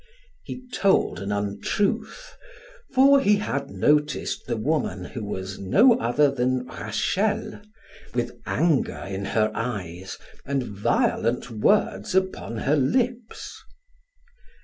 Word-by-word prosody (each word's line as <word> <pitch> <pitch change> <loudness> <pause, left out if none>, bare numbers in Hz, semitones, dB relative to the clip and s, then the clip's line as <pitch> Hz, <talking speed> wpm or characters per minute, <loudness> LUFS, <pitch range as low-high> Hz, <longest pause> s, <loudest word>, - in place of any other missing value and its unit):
He 255 - -8
told 195 -1 +2
an 100 +1 -4
untruth, 200 - -2 0.6
for 275 +1 +6
he 210 -5 +4
had 140 -9 -2
noticed 150 0 0
the 120 -1 -1
woman, 110 - -1
who 115 - -6
was 95 -2 -5
no 215 - +5
other 135 +5 +3
than 125 -1 0
Rachel, 210 - -2 0.5
with - - -1 0.2
anger 165 -5 +1
in 95 0 -4
her 110 +1 +1
eyes 95 -6 -5 0.3
and 140 -1 -1
violent 115 +3 0
words 105 - +1
upon 190 -11 -1
her 145 - +3
lips. 230 - -1
135 Hz, 110 wpm, -25 LUFS, -, 0.6 s, for